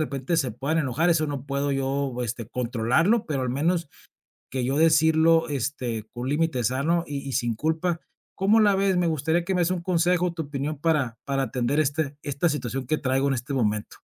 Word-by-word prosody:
repente 135 +4 -2
se 135 -7 0
puedan 140 +8 -1
enojar. 155 +4 +1
Eso 155 -2 +2
no 140 -3 -4
puedo 140 0 -1
yo, 135 -1 -1
este, 120 -1 -4
controlarlo, 125 - +1
pero 140 -4 -1
al 125 - -1
menos, 165 +5 0 0.6
que 130 -1 -1
yo 135 +2 0
decirlo, 160 +1 +4
este, 125 -5 -3
con 120 +1 -4
límite 150 -4 0
sano 140 +9 +1
y 145 -1 -3
y 135 - -3
sin 120 -3 0
culpa. 160 +6 -1 0.4
¿Cómo 205 +4 +3
la 205 -2 +4
ves? 195 -1 +2
Me 175 -1 +2
gustaría 160 +2 0
que 190 - -1
me 180 - +2
des 175 +1 +1
un 180 -2 -1
consejo, 180 0 +1
tu 165 -2 -4
opinión 145 +1 -4
para 145 -8 0
para 135 -1 0
atender 125 +4 -1
este 145 -1 0
esta 145 +4 0
situación 135 -3 -3
que 155 - +1
traigo 135 +1 +1
en - - +1
este 125 +3 -5
momento. 105 -5 -1
145 Hz, 200 wpm, -25 LUFS, 130-165 Hz, 0.6 s, decirlo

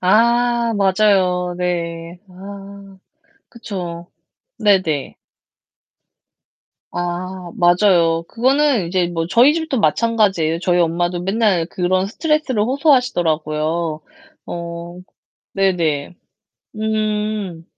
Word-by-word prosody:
아. 235 +4 +2
맞아요. 190 -3 +2
네. 170 -1 -3
아. 195 +1 -11 0.5
그쵸. 180 -7 -7 0.5
네네. 185 -9 +1 1.8
아. 175 0 -5
맞아요. 175 -2 +3
그거는 260 - +2
이제 180 0 +1
뭐 165 -1 -3
저희 250 +9 +5
집도 320 -6 -2
마찬가지예요. 195 -4 +1
저희 180 0 +1
엄마도 175 +1 0
맨날 195 -3 +1
그런 185 +2 0
스트레스를 300 -3 0
호소하시더라고요. 170 - 0 0.5
어 170 +1 -7 0.6
네네. 175 -5 0 0.6
음. 215 -4 -2
185 Hz, 190 characters per minute, -19 LUFS, 170-215 Hz, 1.8 s, 저희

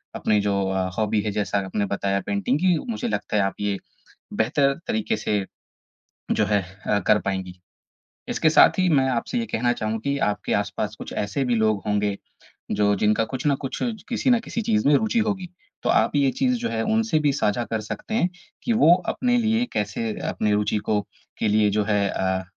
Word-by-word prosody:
अपनी 105 -1 +1
जो 100 -1 0
अ, 95 -1 -1
हॉबी 110 -1 +1
है 105 - -2
जैसा 100 0 -1
आपने 100 +2 -1
बताया 100 0 -1
पेंटिंग 100 +8 0
की, 180 -2 +3
मुझे 240 +2 -3
लगता 110 - -2
है 100 - +3
आप 95 - -1
ये 100 -1 0 0.6
बेहतर 140 +5 +2
तरीके 225 -1 0
से 105 - -1 0.9
जो - - +2
है 105 -2 +2 0.2
अ, 105 - +2
कर 105 - +5
पाएँगी। 95 -2 -4 0.7
इसके 155 - +2
साथ 155 - +6
ही 185 -1 +3
मैं 135 -3 +4
आपसे 125 - -1
ये 235 - -1
कहना 120 - 0
चाहूँगा 110 -1 -2
कि 140 0 0
आपके 105 0 -2
आस-पास 100 -1 -2
कुछ - - -7
ऐसे 105 +7 -2
भी 125 -2 +1
लोग 110 -2 +2
होंगे 105 -1 0 0.6
जो 105 0 +4
जिनका 105 +3 +2
कुछ 130 +1 -4
न 140 - +3
कुछ 135 - -4 0.3
किसी 245 +2 0
न 245 -2 +5
किसी 230 - -4
चीज़ 105 - +1
में 150 - +5
रुचि 220 +7 +1
होगी। 190 -3 -2 0.4
तो - - 0
आप - - +3
ये 140 -2 +4
चीज़ 255 -1 +2
जो 235 - -2
है 110 - -1
उनसे 225 -7 +2
भी 145 -2 +2
साझा 120 -3 0
कर 110 - -1
सकते 110 - -6
हैं 185 -6 +2 0.3
कि 235 - +1
वो 165 - +8 0.2
अपने 245 -1 +1
लिए 225 +1 +2
कैसे 110 +1 -2 0.2
अपनी 105 - 0
रुचि 105 +1 +1
को 105 -1 +3 0.4
के - - +1
लिए 105 0 +3
जो 105 - +3
है 100 -1 +1
अ, 95 0 -1
110 Hz, 200 wpm, -24 LUFS, 105-155 Hz, 0.9 s, वो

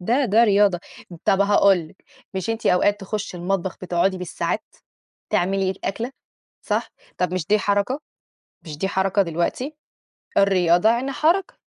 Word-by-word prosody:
ده 245 +9 +1
ده 230 +1 +4
رياضة. 200 -4 +3 0.4
طب 195 - +3
هاقول 200 -1 +5
لِك، 190 - -23 0.3
مش 190 +4 -2
أنتِ 225 0 -3
أوقات 205 +3 +3
تخُشّي 200 -1 -4
المطبخ 185 +1 -2
بتقعدي 185 +1 0
بالساعات 180 -2 -3 0.7
تعملي 190 +1 +1
الأكلة 225 +6 -4 0.5
صح؟ - - -1 0.3
طب 180 -1 -1
مش 185 -4 -2
دي 210 0 +3
حركة؟ 205 +8 0 0.6
مش 155 -4 -8
دي 195 - -1
حركة 195 +1 +1
دلوقتي؟ 180 - -2 0.6
الرياضة 180 -1 +4
يعني 245 +4 +1
حركة. 345 +6 +1
195 Hz, 140 wpm, -22 LUFS, 180-215 Hz, 0.7 s, هاقول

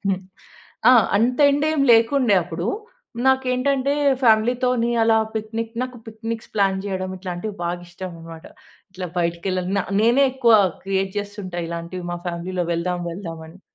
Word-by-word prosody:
హ్మ్. 190 -1 0 0.7
ఆ! - - +8 0.2
అంత 245 +5 +1
ఎండేమి 290 0 +1
లేకుండే 230 -1 +4
అప్పుడు. 170 +1 -5 0.6
నాకేంటంటే, 265 +1 +2 0.3
ఫ్యామిలీ‌తోని 240 +1 +3
అలా 225 0 +4 0.2
పిక్నిక్ 225 +1 -4
నాకు 255 -1 -5
పిక్నిక్స్ 225 0 -6
ప్లాన్ 195 -2 +2
చేయడం 185 -1 -3
ఇట్లాంటివి, 185 +3 -5
బాగా 175 +1 -3
ఇష్టం 180 +1 -7
అనమాట. 165 0 -11 0.5
ఇట్లా 185 -1 -5
బయటికెళ్ళ 170 +2 -1 0.2
న - - +3 0.2
నేనే 240 +5 +4
ఎక్కువ 245 -3 +3 0.3
క్రియేట్ 195 0 -1
చేస్తుంటా 200 -4 -5
ఇలాంటివి, 170 +1 -6
మా 175 - -4
ఫ్యామిలీ‌లో 175 +1 -3
"వెళ్దాం, 180 +1 -2
వెళ్దాం" 165 -2 -7
అని. 180 +4 -16
200 Hz, 135 wpm, -22 LUFS, 180-240 Hz, 0.7 s, ఆ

